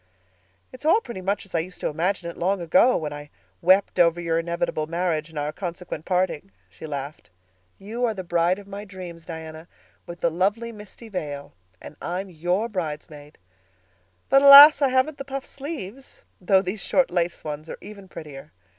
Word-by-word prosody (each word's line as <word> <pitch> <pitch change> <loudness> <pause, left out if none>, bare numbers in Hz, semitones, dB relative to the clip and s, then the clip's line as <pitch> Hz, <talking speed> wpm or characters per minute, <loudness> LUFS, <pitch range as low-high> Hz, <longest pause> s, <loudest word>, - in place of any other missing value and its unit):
"It's 255 - -11
all 325 +8 +5
pretty 235 - -8
much 200 +2 -2
as 195 - -15
I 165 - +2
used 180 +3 -6
to - - 0
imagine 175 +3 -1
it 170 - -6
long 190 +3 0
ago, 180 +9 +4
when 150 -2 -4
I 145 0 -9 0.3
wept 190 +3 +3
over 170 0 +4
your 165 -1 0
inevitable 165 -2 -2
marriage 165 -2 -1
and 160 - -11
our 150 +1 -2
consequent 175 -3 -6
parting," 180 - -1 0.2
she 160 - -10
laughed. 140 -2 -6 0.5
"You 225 +5 -5
are 225 -2 -1
the 190 - -5
bride 175 +1 +1
of 205 - -11
my 200 +1 -8
dreams, 180 -5 -10
Diana, 160 -1 -8 0.4
with 175 0 -9
the 170 - +2
'lovely 205 +7 0
misty 210 +1 -12
veil'; 145 -8 -6 0.3
and 150 - -12
I 175 +1 -3
am 195 -1 -7
your 175 +6 -1
bridesmaid. 150 -6 -6 0.9
But, 275 - +5
alas! 280 +1 +11
I 275 - +4
haven't 260 +3 +1
the - - -4
puffed 275 -1 -6
sleeves—though 255 - -3
these 195 +2 -4
short 270 -7 +2
lace 175 -1 -1
ones 155 +1 -6
are - - -6
even 200 -1 -11
prettier. 145 - -10
180 Hz, 180 wpm, -24 LUFS, 160-210 Hz, 0.9 s, alas